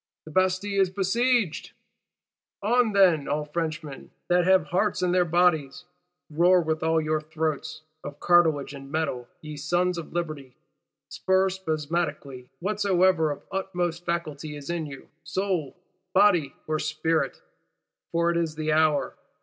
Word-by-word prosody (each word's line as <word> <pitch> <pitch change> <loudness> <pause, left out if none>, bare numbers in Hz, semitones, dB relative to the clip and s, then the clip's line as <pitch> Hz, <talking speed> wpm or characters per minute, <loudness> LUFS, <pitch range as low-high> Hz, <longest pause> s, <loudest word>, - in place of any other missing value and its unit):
The 155 - -10
Bastille 185 +3 +1
is 190 - +3
besieged! 210 0 0 0.9
On, 235 +1 +3
then, 180 -7 +4
all 150 +1 -1
Frenchmen 155 -2 -5 0.2
that 175 0 +3
have 185 -3 +4
hearts 185 +1 0
in 180 - +2
their 180 0 +3
bodies! 175 -2 +1 0.5
Roar 175 +4 +4
with 160 -2 -1
all 160 0 +2
your 155 0 -1
throats, 155 0 -3 0.2
of 145 - -8
cartilage 160 -5 +3
and 135 0 -10
metal, 140 -6 -2
ye 155 -1 -8
Sons 175 +4 0
of 165 - -9
Liberty; 155 -7 -5 0.5
stir 190 0 +1
spasmodically 155 -6 -3
whatsoever 185 -4 +2
of 145 - -5
utmost 175 -3 -2
faculty 155 -3 -4
is 145 +2 -6
in 165 -3 -3
you, 135 -2 -10 0.2
soul, 185 -6 -2 0.4
body 180 -8 +4
or 155 0 -1
spirit; 160 +1 -1 0.7
for 170 0 +2
it 170 - -1
is 165 -2 -1
the 155 0 -2
hour! 155 -1 +2
165 Hz, 140 wpm, -26 LUFS, 155-185 Hz, 0.9 s, then